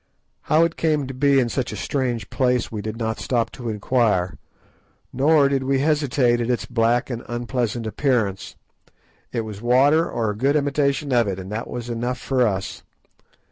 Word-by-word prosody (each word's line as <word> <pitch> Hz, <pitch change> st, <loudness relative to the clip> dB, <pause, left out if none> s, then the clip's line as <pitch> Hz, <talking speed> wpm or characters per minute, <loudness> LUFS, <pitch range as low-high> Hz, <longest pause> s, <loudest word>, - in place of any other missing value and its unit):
How 155 Hz, +2 st, +5 dB
it 165 Hz, 0 st, -1 dB
came 155 Hz, -3 st, +1 dB
to 135 Hz, -, -6 dB
be 140 Hz, +1 st, +3 dB
in 125 Hz, -, +2 dB
such 125 Hz, +1 st, -2 dB
a -, -, -5 dB
strange 120 Hz, 0 st, -2 dB
place 125 Hz, -2 st, +1 dB
we 110 Hz, -2 st, -4 dB
did 110 Hz, +1 st, -5 dB
not 110 Hz, -1 st, -2 dB
stop 115 Hz, -3 st, -1 dB
to 120 Hz, -3 st, -6 dB
inquire, 105 Hz, -4 st, +1 dB, 0.8 s
nor 145 Hz, +2 st, +4 dB
did 140 Hz, -1 st, 0 dB
we 135 Hz, +1 st, +1 dB
hesitate 135 Hz, -4 st, +2 dB
at 120 Hz, -, -2 dB
its 125 Hz, -, 0 dB
black 120 Hz, +1 st, +1 dB
and 120 Hz, -1 st, -4 dB
unpleasant 120 Hz, -1 st, -2 dB
appearance. 110 Hz, -5 st, -1 dB, 0.8 s
It 115 Hz, -, -1 dB
was 105 Hz, -2 st, -8 dB
water, 135 Hz, +7 st, +4 dB
or 115 Hz, -3 st, -1 dB
a -, -, -6 dB
good 135 Hz, +7 st, +1 dB
imitation 145 Hz, 0 st, 0 dB
of 120 Hz, -3 st, +3 dB
it, 95 Hz, -2 st, -2 dB
and 95 Hz, +1 st, -8 dB
that 115 Hz, +3 st, -4 dB
was 120 Hz, -1 st, -5 dB
enough 120 Hz, +2 st, -2 dB
for 130 Hz, -3 st, +1 dB
us. 95 Hz, -2 st, -3 dB
125 Hz, 180 wpm, -22 LUFS, 115-135 Hz, 0.8 s, How